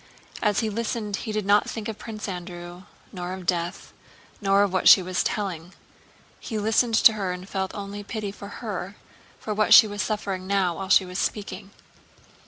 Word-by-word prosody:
As 210 -1 +2
he 220 - -1
listened 215 -2 -3
he 220 - -5
did 215 -2 -2
not 205 +1 +3
think 220 -2 -5
of 220 -2 -6
Prince 220 -1 -7
Andrew, 175 -1 -7 0.3
nor 180 -1 -5
of 185 -1 -8
death, 175 0 -2 0.5
nor 200 0 +4
of 200 -2 -1
what 185 - +2
she 190 - +8
was 185 0 -1
telling. 180 -4 -3 0.6
He 220 - -5
listened 225 +2 +2
to 225 - +7
her 195 -4 -2
and 180 +1 -7
felt 190 -1 -3
only 205 0 -6
pity 210 -1 -4
for 200 0 -10
her, 205 -3 -6 0.4
for 215 - -4
what 215 +1 +5
she - - +10
was 205 -1 -4
suffering 195 -3 -3
now 190 -4 +1
while 195 -1 -5
she 190 - +5
was 180 +1 -5
speaking. 200 -1 -3
200 Hz, 190 wpm, -25 LUFS, 185-210 Hz, 0.6 s, she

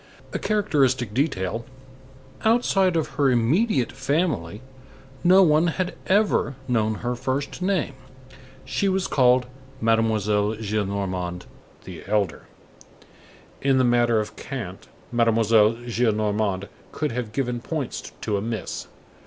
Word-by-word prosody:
A - - -1
characteristic 135 - +1
detail; 115 - -1 0.8
outside 200 -5 +3
of 160 -2 +1
her 140 -2 +4
immediate 130 - +2
family, 135 - -1 0.6
no 185 +2 +7
one 160 0 +4
had 180 +2 -1
ever 200 -8 +2
known 110 -3 +1
her 120 - 0
first 135 +7 -3
name. 180 -7 0 0.7
She 200 - 0
was 190 0 0
called 125 -1 +3 0.3
Mademoiselle 110 -2 +1
Gillenormand, 100 -4 -3 0.4
the - - -9
elder. 100 -6 -1 1.1
In 135 -1 +3
the 130 - +4
matter 120 -2 +3
of 105 - -4
cant, 105 -9 -7 0.2
Mademoiselle 115 -2 +4
Gillenormand 105 -4 0 0.2
could 150 -3 -2
have 115 -2 -4
given 125 -1 -2
points 150 -2 -4
to 105 -2 -1
a - - -2
miss. 110 -2 -4
120 Hz, 115 wpm, -24 LUFS, 105-150 Hz, 1.1 s, no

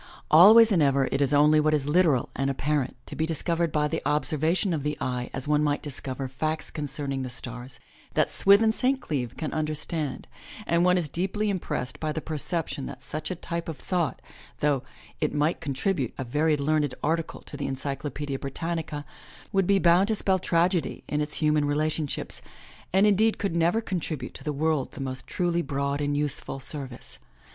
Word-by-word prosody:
Always 215 +8 +9
and 180 -5 +3
ever 140 -2 +3
it - - 0
is 140 -1 +3
only 150 +1 +5
what 155 0 +3
is 145 -2 -1
hteral 150 -4 +3
and 135 +1 0
apparent, 140 -1 -1
to - - -8
be 160 - 0
discovered 165 +1 0
by 150 -1 +1
the - - -2
observation 155 +5 +1
of 155 - -1
the 150 +1 -2
eye 125 -1 -2
as 135 +1 -3
one 150 0 +3
might 145 -1 0
discover 135 -2 -5
facts 155 +4 -3
concerning 145 -2 -3
the 130 - -4
stars, 125 +1 -7 0.4
that - - +2
Swithin 200 +3 +5
St. 260 +4 +1
Cleeve 130 - -3
can 155 - -3
understand, 155 -1 -2 0.4
and 170 +1 +2
one 180 0 +4
is 170 -4 -1
deeply 195 +7 -1
impressed 170 -8 -3
by 155 -1 -1
the 160 - -2
perception 155 -1 -3
that 130 -1 -9
such 155 0 -5
a 185 - -2
type 170 0 -4
of 160 - -5
thought, 175 -4 -2 0.3
though 145 -3 +1 0.4
it - - -1
might 150 +3 +1
contribute 140 - -1
a 135 - -3
very 150 +5 +1
learned 145 -2 +1
article 165 +1 -1
to - - -11
the 145 -1 -3
Encyclopedia 140 +1 -4
Britannica, 155 +1 -4 0.5
would 195 -2 +2
be 200 - +4
bound 180 +1 +4
to 220 - +1
spell 190 -2 +2
tragedy 170 -2 +1
in 150 0 -1
its 150 +1 -2
himian 150 -1 +3
relationships, 150 0 -1 0.5
and 190 +3 +4
indeed 215 +2 +3
could 200 -5 -2
never 170 +7 +2
contribute 160 - -4
to - - -11
the 150 - -1
world 150 -1 0
the - - -9
most 130 -1 -5
truly 175 -1 0
broad 140 -2 -2
and 145 0 0
useful 145 -2 -2
service. 130 - -5
150 Hz, 185 wpm, -26 LUFS, 140-170 Hz, 0.5 s, Always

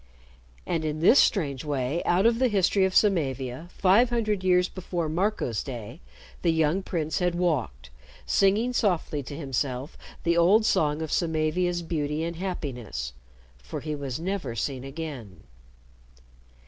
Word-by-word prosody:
And 165 -2 -1
in 155 0 -2
this 195 - +6
strange 140 - +2
way 145 +2 -1
out 180 +4 +3
of 230 0 +4
the 260 - +4
history 195 -2 +2
of 190 - -2
Samavia, 140 - +1
five 200 +7 +4
hundred 215 -5 0
years 180 -1 +4
before 175 -3 -4
Marco's 170 - -1
day, 120 -6 -7 0.4
the 170 - +3
young 160 +3 +1
prince 160 -4 -2
had 180 -1 0
walked 130 - -1 0.3
singing 210 +6 +2
softly 175 -9 0
to 140 +2 -8
himself 135 -1 -3 0.2
the 170 0 +2
old 190 +6 +5
song 150 -5 +1
of 160 - -5
Samavia's 170 +2 0
beauty 155 -2 -2
and 170 0 -4
happiness. 125 - -4 0.5
For 60 +1 -7
he 155 -1 -4
was 140 -3 -4
never 175 -9 -3
seen 130 +3 -3
again. 135 - -7
160 Hz, 145 wpm, -26 LUFS, 140-185 Hz, 0.5 s, this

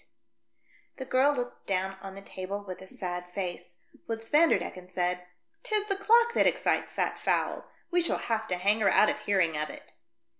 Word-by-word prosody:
T - - -29
I9 115 0 -37
The 260 - -5
girl 265 +3 +3
looked 245 -2 -5
down 190 0 -1
on 195 -1 -8
the 195 - -10
table 195 +2 -5
with 185 -1 -7
a 190 - -10
sad 180 -1 -5
face, 180 -1 -5 0.3
whilst 225 0 -5
Vanderdecken 295 - +2
said, 180 0 -1 0.3
"'Tis 430 -4 0
the 400 -2 -1
clock 465 +4 +4
that - - +4
excites - - +1
that - - 0
fowl; - - 0 0.2
we 355 0 +3
shall 340 - +2
have 220 -1 -2
to 180 - 0
hang 200 +5 +2
her 210 - +4
out 215 - +5
of - - -5
hearing 185 -6 +1
of 150 0 -2
it." - - -12
195 Hz, 195 wpm, -29 LUFS, 180-255 Hz, 0.3 s, out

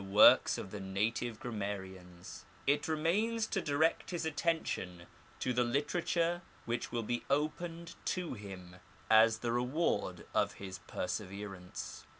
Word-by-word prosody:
works 100 +2 +7
of 95 - -6
the 105 - -5
native 110 +4 -1
grammarians, 95 -5 -6 0.2
it 145 +1 +2
remains 205 +9 +1
to 195 -3 -1
direct 155 +2 +1
his 170 -2 -2
attention 150 - -1 0.4
to 125 - 0
the 125 0 +3
literature 165 +6 +1 0.2
which 120 0 -2
will 120 -1 -1
be 120 +2 -2
opened 165 +4 -1
to 180 -5 -1
him 95 -5 -9 0.3
as 110 0 +6
the 120 - -1
reward 125 +8 0
of - - +2
his 95 -1 -7
perseverance. 95 -2 -5
120 Hz, 130 wpm, -34 LUFS, 100-160 Hz, 0.4 s, works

